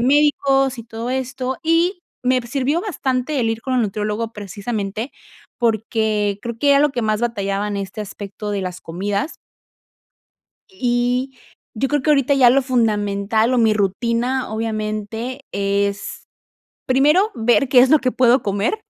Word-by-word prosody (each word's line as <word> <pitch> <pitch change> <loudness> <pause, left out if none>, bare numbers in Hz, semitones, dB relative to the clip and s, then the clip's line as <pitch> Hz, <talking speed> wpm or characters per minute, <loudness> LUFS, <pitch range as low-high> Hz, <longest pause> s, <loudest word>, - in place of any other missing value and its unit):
médicos 270 0 +3
y - - -5
todo 230 +1 -6
esto, 260 0 -3
y 335 +3 +2 0.3
me 255 0 +3
p 235 - -11
sirvió 275 +5 0
bastante 275 - -2
el 225 -2 +1
ir 225 0 -3
con 260 0 -2
el 245 - +3
nutriólogo 210 +2 -2
precisamente, 205 +3 -4 0.5
porque 220 -3 0
creo 235 -1 -5
que 285 +3 +3
era 280 - +6
lo 295 - +4
que 245 -3 -3
más 215 0 0
batallaba 205 -3 -1
en 205 - -3
este 195 +1 -5
aspecto 205 0 -6
de 200 -2 -2
las 180 -1 -5
comidas. 200 - -3 1.4
Y 250 -3 -1 0.4
yo 265 +5 -1
creo 295 0 +1
que 305 - +2
ahorita 280 -1 +3
ya 255 -3 +6
lo 270 +2 +3
fundamental, 220 -2 +1
o - - +3
mi 220 -2 +4
rutina 235 +5 0
obviamente 220 +3 -3
es, 200 0 -2 0.6
primero 300 +11 +4
ver 240 +3 +2
qué 255 -2 +6
es 260 +2 +5
lo 310 - +7
que 255 -1 0
puedo 250 +1 +4
comer, 205 - -1
235 Hz, 160 wpm, -20 LUFS, 210-265 Hz, 1.4 s, lo